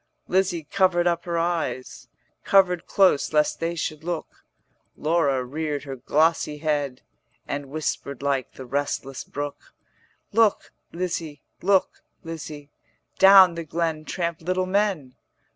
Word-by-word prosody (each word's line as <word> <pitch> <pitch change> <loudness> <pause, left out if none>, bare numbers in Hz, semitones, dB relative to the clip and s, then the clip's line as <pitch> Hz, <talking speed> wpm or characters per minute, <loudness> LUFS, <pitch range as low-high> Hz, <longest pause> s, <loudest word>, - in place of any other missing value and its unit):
Lizzie 185 -3 +1
covered 175 +2 +2
up 170 -1 0
her 170 -1 -2
eyes, 165 -6 -2 0.3
50 - - -15
Covered 180 -3 +4
close 190 -7 +3
lest 150 0 +2
they 165 +1 -2
should 155 -1 -4
look; 170 -1 -5 0.5
Laura 150 -5 +1
reared 145 +1 -3
her 135 -2 -6
glossy 150 +3 +1
head, 145 -4 -2 0.4
And 140 0 -4
whispered 140 -2 -4
like 135 -3 -1
the 130 - -9
restless 135 0 -3
brook: 145 - -7 0.6
'Look, 220 -1 +2 0.2
Lizzie, 165 -4 -4 0.2
look, 190 +1 +2 0.2
Lizzie, 155 -3 -8 0.5
Down 190 -2 +8
the 170 0 -5
glen 160 0 -2
tramp 170 -1 -3
little 185 +2 0
men. 185 -9 -1
160 Hz, 125 wpm, -24 LUFS, 145-175 Hz, 0.6 s, Down